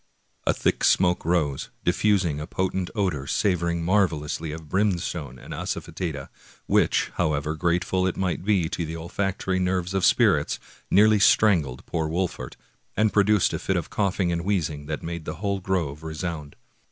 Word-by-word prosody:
A -, -, +4 dB
thick -, -, 0 dB
smoke 90 Hz, -1 st, +3 dB
rose, 80 Hz, -5 st, 0 dB, 0.2 s
diffusing 90 Hz, -5 st, +2 dB
a 75 Hz, -, -5 dB
potent 95 Hz, 0 st, -2 dB
odor 90 Hz, -10 st, -1 dB
savor 90 Hz, 0 st, +1 dB
ing 85 Hz, 0 st, -2 dB
marvelously 85 Hz, -5 st, 0 dB
of 80 Hz, 0 st, -8 dB
brimstone 85 Hz, -, -1 dB
and -, -, -9 dB
asafetida, 75 Hz, -6 st, -4 dB, 0.4 s
which, -, -, +2 dB
how 75 Hz, -, +2 dB
ever 75 Hz, +2 st, -1 dB
grateful 90 Hz, +3 st, 0 dB
it 95 Hz, -, -2 dB
might 90 Hz, -2 st, -1 dB
be 95 Hz, -5 st, +2 dB
to 85 Hz, 0 st, -3 dB
the 80 Hz, 0 st, -5 dB
olfactory 95 Hz, +2 st, -2 dB
nerves 90 Hz, 0 st, 0 dB
of 95 Hz, -1 st, 0 dB
spirits, -, -, +3 dB, 0.3 s
nearly 105 Hz, +2 st, +5 dB
strangled 85 Hz, -, +3 dB
poor 80 Hz, -2 st, -2 dB
Wolfert, 85 Hz, -6 st, -3 dB, 0.4 s
and 105 Hz, 0 st, +2 dB
produced 105 Hz, -1 st, +3 dB
a -, -, -2 dB
fit -, -, -1 dB
of -, -, -4 dB
cough 100 Hz, -2 st, 0 dB
ing 90 Hz, -2 st, +2 dB
and 85 Hz, 0 st, -2 dB
wheezing 80 Hz, -7 st, -1 dB
that 75 Hz, 0 st, -4 dB
made 85 Hz, -1 st, -5 dB
the 75 Hz, -, -4 dB
whole 100 Hz, +2 st, -2 dB
grove 85 Hz, -6 st, -2 dB
resound. 80 Hz, -2 st, -5 dB
85 Hz, 165 wpm, -25 LUFS, 80-95 Hz, 0.4 s, nearly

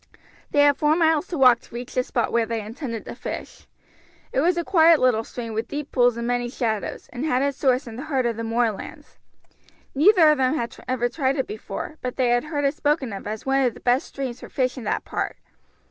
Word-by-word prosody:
They 290 Hz, -, +3 dB
had 285 Hz, -1 st, +4 dB
four 300 Hz, +1 st, +3 dB
miles 320 Hz, 0 st, +2 dB
to 345 Hz, -, -4 dB
walk 250 Hz, -3 st, +6 dB
to -, -, -15 dB
reach 245 Hz, +1 st, -7 dB
the 255 Hz, -, +2 dB
spot 240 Hz, -2 st, -1 dB
where 230 Hz, -1 st, +1 dB
they 230 Hz, 0 st, -2 dB
intended 230 Hz, +1 st, -6 dB
to -, -, -6 dB
fish. -, -, -7 dB, 0.7 s
It -, -, +1 dB
was 345 Hz, +4 st, +2 dB
a 340 Hz, -, 0 dB
quiet 330 Hz, -3 st, +5 dB
little 245 Hz, -3 st, +3 dB
stream 230 Hz, -1 st, -7 dB
with 225 Hz, +2 st, -2 dB
deep 290 Hz, +1 st, -5 dB
pools 245 Hz, -2 st, +3 dB
and 235 Hz, -, -3 dB
many 245 Hz, 0 st, -1 dB
shadows, 220 Hz, -4 st, -3 dB
and 250 Hz, +2 st, -4 dB
had 270 Hz, -4 st, +1 dB
its 280 Hz, -1 st, -1 dB
source 260 Hz, 0 st, +2 dB
in 230 Hz, -2 st, -9 dB
the 265 Hz, -, -6 dB
heart 270 Hz, -5 st, 0 dB
of 235 Hz, -1 st, 0 dB
the 230 Hz, -, -5 dB
moorlands. 225 Hz, -2 st, -3 dB, 0.7 s
Neither 320 Hz, +1 st, +6 dB
of 300 Hz, -, +1 dB
them 260 Hz, +3 st, +2 dB
had 235 Hz, -6 st, -3 dB
ever 250 Hz, -1 st, 0 dB
tried 265 Hz, +1 st, 0 dB
it 265 Hz, -, -1 dB
before, 360 Hz, -6 st, -7 dB
but 250 Hz, -1 st, -4 dB
they 255 Hz, -2 st, +1 dB
had 240 Hz, +2 st, +2 dB
heard 295 Hz, -2 st, -2 dB
it 275 Hz, -, +2 dB
spoken 290 Hz, -6 st, 0 dB
of 195 Hz, -, -7 dB
as 215 Hz, 0 st, -5 dB
one 270 Hz, 0 st, +2 dB
of 250 Hz, -3 st, +1 dB
the -, -, -11 dB
best 250 Hz, +2 st, +1 dB
streams 260 Hz, -3 st, -5 dB
for -, -, -10 dB
fish 255 Hz, -2 st, -1 dB
in 250 Hz, -5 st, -8 dB
that -, -, -1 dB
part. -, -, -3 dB
255 Hz, 240 wpm, -23 LUFS, 235-290 Hz, 0.7 s, walk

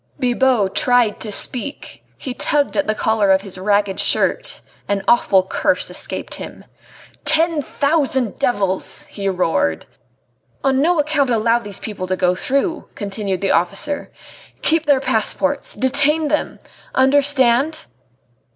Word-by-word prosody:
Bibot 245 Hz, -5 st, +2 dB
tried 245 Hz, -4 st, +2 dB
to 215 Hz, -, -6 dB
speak; 255 Hz, +7 st, -1 dB
he 260 Hz, -, -5 dB
tugged 290 Hz, +3 st, 0 dB
at 295 Hz, -, 0 dB
the 215 Hz, -, 0 dB
collar 220 Hz, -2 st, +1 dB
of 190 Hz, 0 st, +4 dB
his 190 Hz, -2 st, -8 dB
ragged 200 Hz, 0 st, +1 dB
shirt; -, -, 0 dB, 0.3 s
an 200 Hz, -1 st, -1 dB
awful 200 Hz, -5 st, +4 dB
curse 190 Hz, -, -1 dB
escaped -, -, -4 dB
him. -, -, -9 dB, 0.6 s
"Ten 320 Hz, 0 st, +3 dB
thousand 280 Hz, -4 st, 0 dB
devils!" 195 Hz, -5 st, -1 dB
he 195 Hz, -1 st, -3 dB
roared. 165 Hz, -, 0 dB, 0.8 s
"On 265 Hz, 0 st, +2 dB
no 340 Hz, +2 st, +2 dB
account 295 Hz, -2 st, +1 dB
allow 230 Hz, 0 st, +2 dB
these 205 Hz, -4 st, -6 dB
people 200 Hz, -4 st, -5 dB
to 185 Hz, -, 0 dB
go 180 Hz, -1 st, +2 dB
through," 275 Hz, -, -2 dB
continued 200 Hz, -2 st, -4 dB
the 195 Hz, -, +1 dB
officer. 230 Hz, +12 st, -1 dB, 0.5 s
"Keep 320 Hz, -1 st, +1 dB
their 280 Hz, -3 st, +4 dB
passports. 280 Hz, +4 st, -1 dB
Detain 285 Hz, +4 st, +2 dB
them!... 300 Hz, -, -1 dB, 0.4 s
Understand?" 275 Hz, +1 st, +2 dB
245 Hz, 135 wpm, -19 LUFS, 200-285 Hz, 0.8 s, of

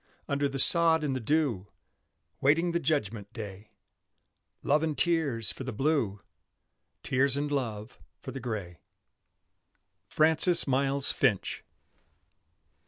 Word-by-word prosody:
Under 140 Hz, 0 st, -1 dB
the 135 Hz, -, -5 dB
sod 165 Hz, +2 st, +5 dB
and 140 Hz, -3 st, -2 dB
the -, -, -2 dB
dew, 120 Hz, -6 st, -1 dB, 0.7 s
Waiting 165 Hz, +5 st, +2 dB
the 170 Hz, -, -1 dB
judgment 115 Hz, -10 st, -2 dB
day; 105 Hz, -1 st, -9 dB, 0.9 s
Love 150 Hz, +2 st, +2 dB
and 155 Hz, -2 st, -2 dB
tears 150 Hz, -10 st, +2 dB
for -, -, -8 dB
the 130 Hz, -, -5 dB
Blue, 120 Hz, -5 st, -1 dB, 0.8 s
Tears 135 Hz, +1 st, +2 dB
and 145 Hz, +1 st, -3 dB
love 115 Hz, -5 st, -4 dB, 0.2 s
for -, -, -9 dB
the 135 Hz, -, -7 dB
Gray. 100 Hz, -, -6 dB, 1.3 s
FRANCIS 160 Hz, +3 st, +3 dB
MILES 135 Hz, 0 st, +1 dB
FINCH. -, -, -1 dB
135 Hz, 115 wpm, -28 LUFS, 110-155 Hz, 1.3 s, sod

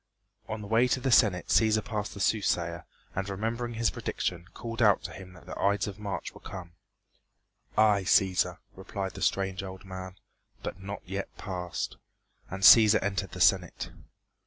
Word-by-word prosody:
On 110 Hz, -1 st, -4 dB
the 105 Hz, -, -7 dB
way 115 Hz, +4 st, +4 dB
to 130 Hz, -, +1 dB
the 130 Hz, 0 st, -1 dB
Senate 95 Hz, -6 st, +4 dB
Cæsar 110 Hz, 0 st, +3 dB
passed 110 Hz, -3 st, -4 dB
the -, -, -8 dB
soothsayer, 85 Hz, -5 st, 0 dB, 0.3 s
and 95 Hz, +1 st, -3 dB
remembering 115 Hz, +4 st, -3 dB
his 115 Hz, 0 st, +1 dB
prediction 90 Hz, -1 st, -3 dB
called 115 Hz, 0 st, -5 dB
out 105 Hz, -3 st, +4 dB
to -, -, -5 dB
him 95 Hz, -1 st, -11 dB
that 90 Hz, -, -16 dB
the -, -, -7 dB
Ides 100 Hz, -1 st, +2 dB
of 100 Hz, 0 st, -7 dB
March 100 Hz, -2 st, -4 dB
were -, -, -14 dB
come. 85 Hz, -2 st, -8 dB, 1.1 s
"Aye, 105 Hz, -3 st, +4 dB
Cæsar," 95 Hz, 0 st, +3 dB, 0.2 s
replied 95 Hz, 0 st, -5 dB
the -, -, -9 dB
strange 95 Hz, -1 st, 0 dB
old 95 Hz, 0 st, -8 dB
man, 95 Hz, -1 st, -7 dB, 0.5 s
"but 95 Hz, -, -5 dB
not 100 Hz, +1 st, -6 dB
yet 95 Hz, +2 st, -4 dB
past." 90 Hz, -2 st, -4 dB, 0.5 s
And 95 Hz, +1 st, -6 dB
Cæsar 110 Hz, +3 st, +9 dB
entered 100 Hz, -1 st, -2 dB
the -, -, -7 dB
Senate. -, -, +2 dB
100 Hz, 170 wpm, -29 LUFS, 95-110 Hz, 1.1 s, Cæsar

